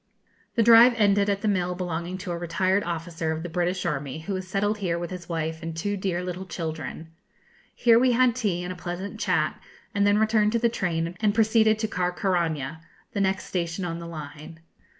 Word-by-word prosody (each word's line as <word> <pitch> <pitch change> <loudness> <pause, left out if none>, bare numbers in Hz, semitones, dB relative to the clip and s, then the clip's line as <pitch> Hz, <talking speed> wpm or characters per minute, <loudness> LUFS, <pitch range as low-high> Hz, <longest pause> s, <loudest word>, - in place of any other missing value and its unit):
The 230 - +4
drive 235 +2 +8
ended 205 -1 +3
at 200 0 0
the 215 - -1
mill 180 -3 0
belonging 175 0 -3
to 185 -1 -5
a 170 - -2
retired 185 +3 +1
officer 165 -1 -3
of 160 +1 -3
the 175 - -5
British 180 +2 -1
army, 145 -2 -3
who 195 +5 -4
has 185 -1 -4
settled 205 +3 0
here 175 -4 -1
with 175 0 -5
his 180 -2 -8
wife 160 -1 -3
and 165 0 -5
two 205 +5 -1
dear 185 -2 -2
little 180 +1 -5
children. 160 -1 -5 0.7
Here 230 -1 +5
we 250 0 +4
had 250 -1 +4
tea 200 -8 -1
and 180 +1 -4
a - - -11
pleasant 180 +4 -6
chat, - - 0 0.3
and 200 0 +2
then 205 0 +4
returned 215 0 +3
to 235 - +2
the 235 0 +3
train 170 -5 -2
and 210 -1 +1
proceeded 220 -1 +4
to 220 0 -1
Carcaraña, 175 -6 -1 0.3
the 200 - 0
next 190 0 +1
station 175 0 -2
on 170 -1 -4
the 170 - -7
line. 155 +1 -9
180 Hz, 205 wpm, -26 LUFS, 170-205 Hz, 0.7 s, drive